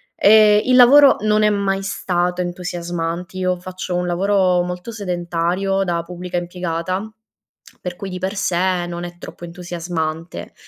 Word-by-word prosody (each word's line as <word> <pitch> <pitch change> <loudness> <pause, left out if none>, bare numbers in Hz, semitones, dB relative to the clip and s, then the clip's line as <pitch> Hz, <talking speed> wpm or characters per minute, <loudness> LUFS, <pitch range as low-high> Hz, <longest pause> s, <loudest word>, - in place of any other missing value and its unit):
E 210 0 +6
il 255 0 +3
lavoro 275 +3 +7
non 215 0 +2
è 210 - +5
mai 195 -1 -1
stato 180 -2 -1
entusiasmant 175 0 -4
io 185 -1 -1
faccio 185 0 -5
un 180 0 -1
lavoro 185 0 +2
molto 180 +5 -6
sedentario, 180 0 -1
da 170 -2 -1
pubblica 180 +1 -6
impiegata, 180 +3 -3 0.7
per 180 -1 -5
cui 195 - -6
di 180 0 -6
per 190 +3 -3
sé, 185 -2 0
non 175 0 -5
è 175 0 -8
troppo 175 - -11
entusiasmante. 170 -2 -5
180 Hz, 145 wpm, -20 LUFS, 175-195 Hz, 0.7 s, lavoro